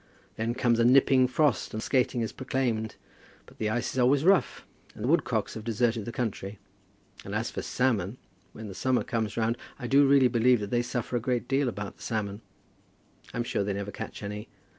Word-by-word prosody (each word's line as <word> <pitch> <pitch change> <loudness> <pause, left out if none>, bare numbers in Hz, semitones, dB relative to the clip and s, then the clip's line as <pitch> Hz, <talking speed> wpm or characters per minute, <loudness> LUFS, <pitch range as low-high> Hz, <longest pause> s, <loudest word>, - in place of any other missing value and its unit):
Then 115 +2 -2
comes 120 -2 +2
a - - +4
nipping 130 +1 +5
frost, 135 -3 +1
and 110 - -3
skating 125 -2 +1
is 110 - -2
proclaimed; 125 -5 -2 0.5
but - - -19
the 110 - 0
ice 120 +3 -1
is 130 - -2
always 135 +4 +3
rough, 195 0 +3 0.3
and - - -7
the - - 0
woodcocks - - +1
have 110 - -7
deserted 115 -1 0
the 120 - -4
country. 110 -4 -4 0.7
And - - -5
as - - -1
for - - -4
salmon, 115 -4 0 0.3
when 110 0 -9
the 100 - -7
summer 125 +7 +1
comes 110 -3 -2
round 115 +1 0 0.2
I 125 - -7
do 140 +3 +5
really 135 -2 +6
believe 120 0 +3
that 100 - -5
they 120 - +2
suffer 120 0 -2
a - - 0
great 125 +1 -1
deal 135 -1 +1
about 105 -2 -6
the - - -19
salmon. 105 -2 -3 0.9
I'm 120 - -2
sure 110 - -1
they 100 0 -1
never 100 +1 -4
catch - - -7
any. 105 +1 -6
120 Hz, 205 wpm, -28 LUFS, 110-130 Hz, 0.9 s, really